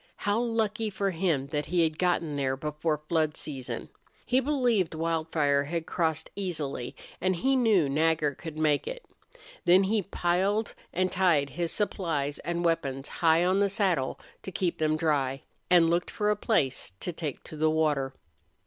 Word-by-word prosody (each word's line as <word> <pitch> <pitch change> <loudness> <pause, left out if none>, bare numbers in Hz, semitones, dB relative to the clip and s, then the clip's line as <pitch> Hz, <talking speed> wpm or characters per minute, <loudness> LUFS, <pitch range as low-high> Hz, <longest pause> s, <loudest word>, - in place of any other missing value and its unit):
How 205 +2 0
lucky 225 -2 0
for 195 0 -1
him 165 -6 0
that 150 0 -2
he 175 0 +2
had 155 -1 -1
gotten 170 -4 +1
there 135 -1 0
before 150 +1 -2
flood 155 -2 +1
season! 135 -4 -5 0.4
He 255 +1 +3
believed 245 - +1
Wildfire 160 -3 +1
had 165 +2 -3
crossed 160 -3 -1
easily, 155 -10 -4 0.3
and 185 0 +2
he 265 +10 +2
knew 220 - +4
Nagger 155 +1 +2
could 160 +2 -8
make 150 -2 +1
it. - - -6 0.6
Then 185 +3 +6
he 210 +2 +1
piled 195 +3 0 0.2
and 185 +1 0
tied 165 -7 +2
his 170 +3 -2
supplies 160 -9 -1
and 170 +1 -2
weapons 140 -5 0
high 165 +1 +3
on 185 +2 +3
the 200 0 +3
saddle, 185 -9 0 0.2
to 190 - -7
keep 175 0 -1
them 155 0 +2
dry, 140 -4 0 0.3
and 175 -2 +6
looked 170 +1 +1
for 210 0 0
a - - +2
place 140 - 0
to 175 - -4
take 155 -4 -5
to - - -8
the 155 +1 +2
water. 150 -4 +1
165 Hz, 165 wpm, -28 LUFS, 150-190 Hz, 0.6 s, Then